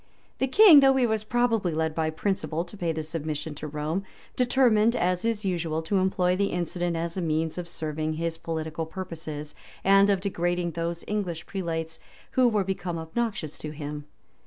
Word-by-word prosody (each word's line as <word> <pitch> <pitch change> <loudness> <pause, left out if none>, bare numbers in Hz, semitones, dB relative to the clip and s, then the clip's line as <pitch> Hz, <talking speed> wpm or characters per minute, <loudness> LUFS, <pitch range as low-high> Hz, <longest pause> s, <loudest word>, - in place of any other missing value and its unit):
The 265 - +2
king, 345 +2 +9
though 270 -1 +5
he 260 -2 +3
was 220 -2 0
probably 225 -6 +1
led 160 0 0
by 160 0 0
principle 170 -1 -2
to 175 - -11
pay 175 -4 -1
this 160 -1 -4
submission 155 -1 -3
to 150 +1 -7
Rome, 150 +5 -2 0.3
determined, 245 -3 +3
as 180 -2 +1
is 225 -2 -1
usual, 165 -3 -1
to 195 +5 0
employ 185 -1 +2
the 200 +1 +1
incident 175 -1 -2
as 170 +2 -3
a - - 0
means 160 +1 -1
of 175 -1 -6
serving 155 -1 -2
his 165 +1 -3
political 160 -1 -4
purposes, 160 -4 -6 0.3
and 195 +1 +6
of 200 -2 +3
degrading 175 -2 -1
those 170 +1 -3
English 180 -6 -2
prelates, 165 -4 -3 0.3
who 255 -2 +4
were 210 -3 +1
become 185 -2 -3
obnoxious 160 -1 -3
to 155 - -5
him. 150 -1 -6
175 Hz, 180 wpm, -27 LUFS, 160-200 Hz, 0.3 s, king